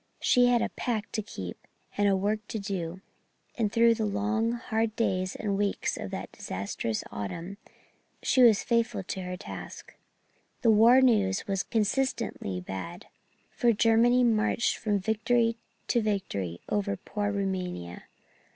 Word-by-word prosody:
She 245 Hz, 0 st, +4 dB
had 245 Hz, -1 st, +3 dB
a -, -, -1 dB
pact 220 Hz, -4 st, -3 dB
to 215 Hz, -, 0 dB
keep 95 Hz, -, -8 dB, 0.3 s
and 205 Hz, 0 st, +2 dB
a 195 Hz, -, +3 dB
work 205 Hz, +3 st, 0 dB
to -, -, -4 dB
do; 190 Hz, -3 st, -4 dB, 0.5 s
and 215 Hz, -4 st, 0 dB
through 230 Hz, +1 st, +5 dB
the 225 Hz, -1 st, -1 dB
long 215 Hz, +3 st, 0 dB
hard 225 Hz, -2 st, -1 dB
days 185 Hz, -4 st, 0 dB
and 205 Hz, -2 st, -2 dB
weeks 205 Hz, -1 st, 0 dB
of -, -, -6 dB
that -, -, -6 dB
disastrous 100 Hz, +3 st, -4 dB
autumn 165 Hz, -, -5 dB, 0.7 s
she 260 Hz, -, +3 dB
was 230 Hz, -4 st, +6 dB
faithful 230 Hz, -4 st, 0 dB
to 190 Hz, +1 st, -4 dB
her 180 Hz, 0 st, -5 dB
task. -, -, -9 dB, 0.7 s
The 230 Hz, -, +6 dB
war 230 Hz, +4 st, +7 dB
news 210 Hz, -6 st, +3 dB
was 195 Hz, -3 st, 0 dB
consistently 225 Hz, -, -1 dB
bad, 165 Hz, -, -7 dB, 0.4 s
for 240 Hz, -2 st, +2 dB
Germany 230 Hz, +3 st, +4 dB
marched 225 Hz, 0 st, +2 dB
from 210 Hz, -2 st, 0 dB
victory 230 Hz, +3 st, +1 dB, 0.3 s
to 240 Hz, -, +3 dB
victory 100 Hz, -, -2 dB
over 200 Hz, -1 st, -1 dB
poor 205 Hz, +2 st, -3 dB
Rumania. 185 Hz, -, -3 dB
210 Hz, 145 wpm, -28 LUFS, 190-230 Hz, 0.7 s, war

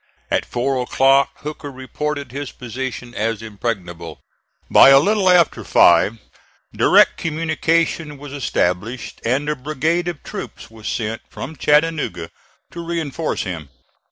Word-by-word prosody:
At -, -, +1 dB
four 130 Hz, +1 st, -1 dB
o'clock 135 Hz, +2 st, +3 dB
Hooker 150 Hz, -1 st, -6 dB
reported 140 Hz, +1 st, -5 dB
his 140 Hz, +1 st, -5 dB
position 125 Hz, 0 st, -6 dB
as 115 Hz, -1 st, -2 dB
impregnable. 90 Hz, -7 st, -5 dB, 0.5 s
By -, -, +8 dB
a 135 Hz, 0 st, +8 dB
little 200 Hz, +4 st, +2 dB
after 175 Hz, -3 st, +4 dB
five 85 Hz, +6 st, +4 dB, 0.6 s
direct -, -, +5 dB
communication 160 Hz, -1 st, -1 dB
was 140 Hz, 0 st, -10 dB
established, 115 Hz, -3 st, -2 dB
and 135 Hz, +5 st, 0 dB
a 150 Hz, -, 0 dB
brigade 155 Hz, +5 st, -1 dB
of 170 Hz, -4 st, -5 dB
troops -, -, -8 dB
was 110 Hz, -1 st, -10 dB
sent 110 Hz, -1 st, -3 dB
from 160 Hz, -, -7 dB
Chattanooga 150 Hz, -, +1 dB, 0.4 s
to 170 Hz, -, -7 dB
reinforce 165 Hz, -2 st, -2 dB
him. 85 Hz, -6 st, -6 dB
135 Hz, 130 wpm, -20 LUFS, 115-155 Hz, 0.6 s, By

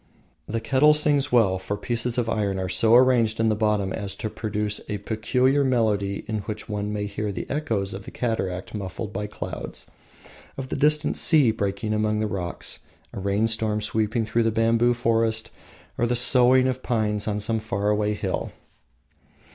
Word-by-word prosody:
The 115 Hz, +2 st, -2 dB
kettle 135 Hz, +6 st, +4 dB
sings 145 Hz, -2 st, +2 dB
well, 100 Hz, -6 st, +3 dB
for 100 Hz, +2 st, -4 dB
pieces 120 Hz, +3 st, -2 dB
of 120 Hz, -2 st, 0 dB
iron 100 Hz, -4 st, -1 dB
are 95 Hz, 0 st, -2 dB
so 110 Hz, +5 st, +3 dB
arranged 120 Hz, -3 st, +4 dB
in 115 Hz, 0 st, +2 dB
the 110 Hz, -, +1 dB
bottom 105 Hz, -3 st, 0 dB
as 100 Hz, -2 st, -4 dB
to 110 Hz, +1 st, -5 dB
produce 105 Hz, -1 st, -2 dB
a 105 Hz, -, -2 dB
peculiar 125 Hz, +7 st, +1 dB
melody 105 Hz, -6 st, 0 dB
in 110 Hz, -1 st, -2 dB
which 105 Hz, +1 st, -6 dB
one 105 Hz, -1 st, -3 dB
may 105 Hz, -1 st, -3 dB
hear 105 Hz, +1 st, -3 dB
the 95 Hz, -, -6 dB
echoes 110 Hz, -10 st, -2 dB
of 95 Hz, -, -8 dB
a -, -, -5 dB
cataract 95 Hz, -6 st, -3 dB
muffled 105 Hz, +1 st, -5 dB
by 105 Hz, +1 st, -3 dB
clouds, 105 Hz, -, -7 dB, 0.7 s
of 130 Hz, -1 st, -6 dB
a -, -, -1 dB
distant 150 Hz, +1 st, +3 dB
sea 145 Hz, -8 st, +5 dB
breaking 105 Hz, 0 st, -2 dB
among 105 Hz, 0 st, 0 dB
the 110 Hz, -, 0 dB
rocks, 90 Hz, -4 st, -2 dB, 0.3 s
a -, -, -5 dB
rainstorm 105 Hz, +2 st, 0 dB
sweeping 110 Hz, +1 st, -1 dB
through 115 Hz, +1 st, +1 dB
a -, -, +3 dB
bamboo 115 Hz, +2 st, +2 dB
forest, 115 Hz, -1 st, 0 dB, 0.5 s
or -, -, +1 dB
of -, -, -2 dB
the 125 Hz, -, +1 dB
soughing 130 Hz, +1 st, +5 dB
of 130 Hz, 0 st, -2 dB
pines 105 Hz, -4 st, -1 dB
on 105 Hz, -1 st, -1 dB
some 110 Hz, +2 st, 0 dB
faraway 105 Hz, 0 st, -1 dB
hill. -, -, -3 dB
110 Hz, 180 wpm, -24 LUFS, 105-120 Hz, 0.7 s, sea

